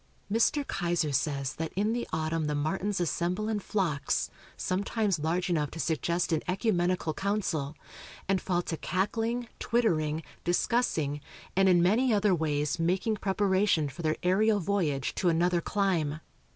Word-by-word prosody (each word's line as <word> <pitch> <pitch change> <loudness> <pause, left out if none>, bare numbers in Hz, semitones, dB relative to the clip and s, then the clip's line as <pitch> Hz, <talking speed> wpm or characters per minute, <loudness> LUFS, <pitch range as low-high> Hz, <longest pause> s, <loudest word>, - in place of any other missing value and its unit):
Mr. 235 +6 +2
Keyser 170 -5 0
says 140 0 0
that 160 0 -3
in 210 +4 +1
the 240 0 -2
autumn 160 0 -1
the 150 0 -1
martins 190 +7 -1
assemble 175 +4 -1
in 220 -1 0
flocks, 170 -9 -1 0.3
sometimes 195 0 0
large 165 +4 0
enough 155 -5 0
to 165 - -9
suggest 170 +2 0
an 160 - +2
ecumenical 180 -4 +1
council, 175 -8 -1 0.5
and 190 -1 +1
fall 175 -2 0
to 165 - -3
cackling, 225 +7 -1
twittering, 160 -10 +1 0.2
discussing, 175 - +1 0.3
and 190 0 +5
in 175 -2 +5
many 235 +8 +3
other 205 -2 +3
ways 150 -2 0
making 185 +6 +1
preparation 195 -5 +2
for 140 +5 -8
their 155 -1 0
aerial 205 +4 +3
voyage 165 -8 0
to 180 - +1
another 170 +1 +2
clime. 170 -7 0
180 Hz, 145 wpm, -29 LUFS, 155-205 Hz, 0.5 s, and